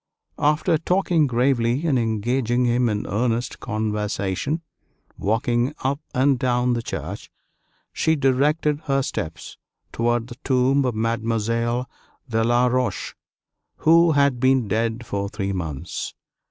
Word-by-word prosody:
After 155 +2 +2
talking 175 -3 +2
gravely 125 +2 +1
and 140 -6 +2
engaging 120 +2 0
him 120 0 +2
in 105 -1 -2
earnest 120 +3 -1
conversation, 105 - -2 0.5
walking 120 +6 0
up 140 +2 0 0.2
and 130 0 +3
down 125 0 +1
the 120 - -1
church, - - -6 0.6
she 160 - +2
directed 145 +2 +2
her 135 -1 +1
steps 80 -8 -5 0.3
toward 120 0 0
the 120 - -10
tomb 130 +1 +2
of 125 -3 -1
Mademoiselle 115 +2 -1 0.4
de 115 -2 0
La 120 +2 +3
Roche, 125 0 -1 0.6
who 165 +1 +5
had 140 -3 +3
been 130 -2 +3
dead 115 +3 -1
for 100 -1 -3
three 100 -1 -3
months. 80 -7 -5
120 Hz, 125 wpm, -23 LUFS, 115-135 Hz, 0.6 s, who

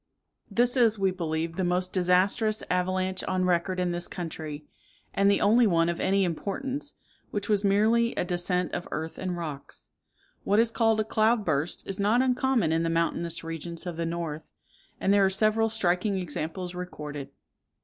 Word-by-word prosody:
This 240 +4 +2
is, 230 -4 +4
we 195 -1 +2
believe, 165 -2 -3
the 190 - 0
most 180 +1 0
disastrous 190 +4 +2
avalanche 185 +1 0
on 185 -1 0
record 180 +1 +1
in 180 -1 0
this 175 0 -2
country, 155 -4 -6 0.5
and 200 0 +3
the 200 - +3
only 225 +3 +5
one 165 -3 +3
of 170 - -2
any 195 +1 +2
importance, 260 - -3 0.3
which 205 -1 -3
was 210 -1 +2
merely 220 +4 +3
a - - -1
descent 180 +1 -1
of - - -3
earth 160 +2 -5
and 185 -1 -3
rocks. 150 -5 -7 0.5
What 205 - +2
is 230 0 +3
called 225 -2 +2
a - - +3
cloud 220 0 +2
burst 155 +1 -1
is 195 0 -4
not 215 +5 +3
uncommon 250 -7 +1
in 165 0 +2
the 165 - 0
mountainous 170 0 -1
regions 165 +1 -5
of 175 -2 -4
the 165 0 -2
north; 165 -2 -4 0.5
and 195 - +2
there 200 -1 +5
are 190 - +4
several 215 +3 +2
striking 195 -2 0
examples 175 +1 -4
recorded. 150 -6 -6
185 Hz, 175 wpm, -27 LUFS, 170-210 Hz, 0.5 s, only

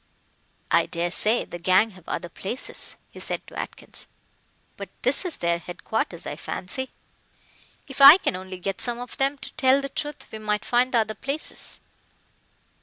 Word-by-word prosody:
"I - - +4
daresay 175 +7 +3
the 175 - -8
gang 185 +5 +4
have 185 -3 -14
other 175 - -3
places," 195 +8 -5 0.2
he - - -11
said - - -3
to - - -15
Atkins, - - -7 0.7
"but - - -7
this - - +2
is 350 - -2
their 170 0 0
headquarters, 175 0 -3
I - - -5
fancy. 260 +8 -4 1.0
If 275 0 -5
I 280 +5 +12
can 370 - -1
only 185 0 -7
get 195 +1 -3
some 240 -1 0
of 245 0 -7
them 275 +1 +1
to - - -10
tell 265 0 +4
the 275 0 -4
truth 295 +1 -5
we 220 - -6
might 210 -1 -1
find 250 +1 +2
the 240 - +3
other 215 -1 +1
places." 275 +7 -4
220 Hz, 170 wpm, -25 LUFS, 185-270 Hz, 1.0 s, I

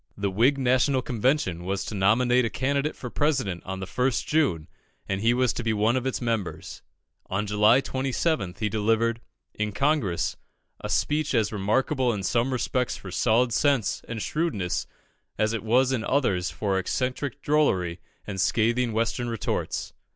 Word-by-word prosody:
The 100 -1 -1
Whig 120 +9 +3
National 130 0 +2
Convention 120 - 0
was 95 +1 -2
to - - -5
nominate 120 +6 +3
a 115 - 0
candidate 140 +6 -1
for 125 - -7
President 130 - 0
on 95 0 -4
the - - -3
1st 125 +5 0
June, 105 - +1 0.4
and 95 0 -2
he 115 +2 +4
was 125 0 +2
to 120 - -4
be 110 -1 +1
one 110 +3 +2
of 130 0 -1
its 130 - -2
members. 115 -6 -3 0.5
On 100 +3 -1
July 105 +5 +4
27th, 130 - -1
he 110 - -1
delivered, 115 +2 +1 0.3
in 105 0 -2
Congress, 135 - 0 0.4
a - - -6
speech 150 -2 0
as 110 -3 +2
remarkable 125 +6 +1
in 100 -2 -4
some 120 +6 +1
respects 125 0 -1
for 95 - -9
solid 120 +4 +2
sense 135 -2 +1
and 115 -2 -4
shrewdness 150 - -1 0.5
as 110 +1 +1
it 115 - -2
was 125 +4 +3
in 125 -4 -1
others 100 -11 +1
for 100 -3 -1
eccentric 125 +6 -2
drollery 95 - +1 0.3
and 95 -2 -3
scathing 115 +3 +1
Western 115 +2 -1
retorts. 115 -2 -3
115 Hz, 165 wpm, -26 LUFS, 100-130 Hz, 0.5 s, he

